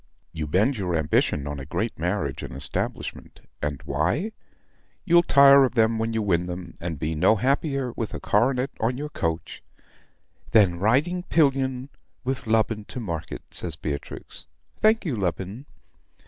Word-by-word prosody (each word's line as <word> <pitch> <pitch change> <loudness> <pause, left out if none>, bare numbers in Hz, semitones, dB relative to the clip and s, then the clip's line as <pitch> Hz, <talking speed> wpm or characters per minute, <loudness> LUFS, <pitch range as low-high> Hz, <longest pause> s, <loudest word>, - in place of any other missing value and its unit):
You 80 -2 -4
bend 105 - +2
your 90 -3 -1
ambition 75 -2 +1
on 75 -1 -4
a - - -6
great - - -3
marriage - - -1
and - - -7
establishment 70 - -3 0.2
and 75 -2 -3
why? 90 - 0 0.7
You'll 170 -1 +6
tire 140 -3 +7
of 130 -1 0
them 110 -1 +3
when 115 +1 -1
you 110 -1 -1
win 90 -3 +1
them; 90 -1 -6
and 85 -2 -4
be 80 +3 -2
no 80 +8 +4
happier 135 +2 0
with 115 -2 -4
a - - -4
coronet 125 +5 +1
on 120 +3 0
your 150 +2 -4
coach 80 - -3 0.5
" - - -30
"Than 95 -6 +5
riding 140 - +2
pillion 135 -6 +1 0.3
with 130 -1 -3
Lubin 110 -1 +1
to 125 - -7
market," 85 -9 -5
says 85 -4 -2
Beatrix. 75 -2 -6 0.3
"Thank 220 0 +3
you, 150 -8 -1
Lubin!" 95 +6 -3
110 Hz, 160 wpm, -25 LUFS, 85-135 Hz, 0.7 s, tire